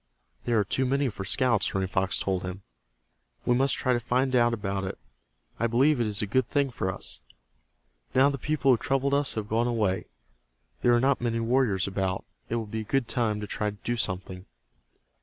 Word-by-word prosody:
"There 120 -2 +2
are 105 - +4
too 130 +6 0
many 140 +1 +1
for 100 -3 -6
scouts," 115 +1 +2
Running 95 -1 0
Fox 95 0 0
told 95 -2 -1
him. 90 +1 -6 0.8
"We 125 - +3
must 135 +2 +2
try 130 - +1
to 120 - +1
find 130 +2 0
out 120 -1 +4
about 100 -3 -2
it 95 - -4 0.6
I 115 - +2
believe 130 +5 +3
it 115 - +1
is 105 0 0
a - - +1
good 120 +4 +1
thing 140 -1 +1
for 95 -5 -2
us. - - -5 1.0
Now 130 +2 +6
the 140 - -5
people 140 -1 +2
who 125 - +5
troubled 135 +3 0
us 140 0 +2
have 110 -2 -3
gone 115 +2 +1
away. 105 -6 0 0.7
There 120 - +4
are - - +4
not 135 +1 +2
many 115 -1 0
warriors 115 -5 +1
about. 95 -1 -2 0.2
It 115 - -1
will 115 -1 -2
be 110 +1 -4
a - - -5
good 125 +3 0
time 115 -2 0
to - - -3
try 105 +1 -2
to 105 - -9
do 120 - -1
something." 95 -3 -3
115 Hz, 210 wpm, -27 LUFS, 100-130 Hz, 1.0 s, Now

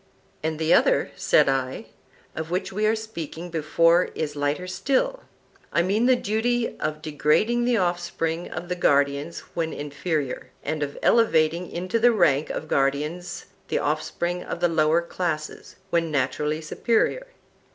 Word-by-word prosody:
And 160 0 -2
the 160 +1 +2
other, - - +3
said - - +3
I, 135 -1 -1 0.5
of 160 0 -4
which 180 +2 -2
we 210 +2 +1
were 220 - +3
speaking 175 -6 -7
before 165 +2 +3
is 150 -2 -3
lighter 145 +5 -1
still,—I 275 - -2
mean 210 +6 +2
the 255 - +6
duty 235 +2 0
of 155 0 -3
degrading 160 - +2
the 245 -1 +2
offspring 175 -2 -1
of 175 - -6
the 180 - -2
guardians 140 -1 +1
when 165 -1 -1
inferior, 145 -1 -3
and 155 +1 -2
of 145 -1 -3
elevating 170 -6 +3
into 185 +6 -2
the 240 +2 +6
rank 155 -9 +2
of 155 - -4
guardians 150 +6 -1 0.2
the - - 0
offspring 170 +4 -1
of - - -5
the 175 - +3
lower 160 +1 +3
classes, 165 -3 -4 0.2
when 165 -1 +1
naturally 150 +2 -1
superior. 235 - 0
165 Hz, 145 wpm, -25 LUFS, 155-185 Hz, 0.5 s, the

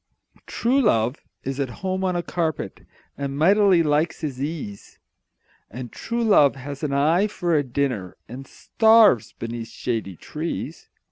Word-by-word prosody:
True 260 +4 +1
love 120 - +2 0.3
is 135 +1 -4
at 135 -2 -1 0.2
home 190 0 -1
on 185 -1 0
a 175 - -1
carpet, 165 -3 -3 0.3
And 140 0 -3
mightily 190 +2 +4
likes 150 +3 0
his 135 -5 -4
ease 140 -10 -6 0.7
And 120 +2 -8
true 235 0 -3
love 150 -12 +5
has 140 +1 -8
an 150 -3 -2
eye 160 +8 +3
for 175 -5 -2
a 150 - +4
dinner, 125 -8 -2
And 130 +4 -9
starves 220 - +4
beneath 115 0 -6
shady 110 -7 -4
trees. 155 - -6
145 Hz, 145 wpm, -23 LUFS, 130-180 Hz, 0.7 s, love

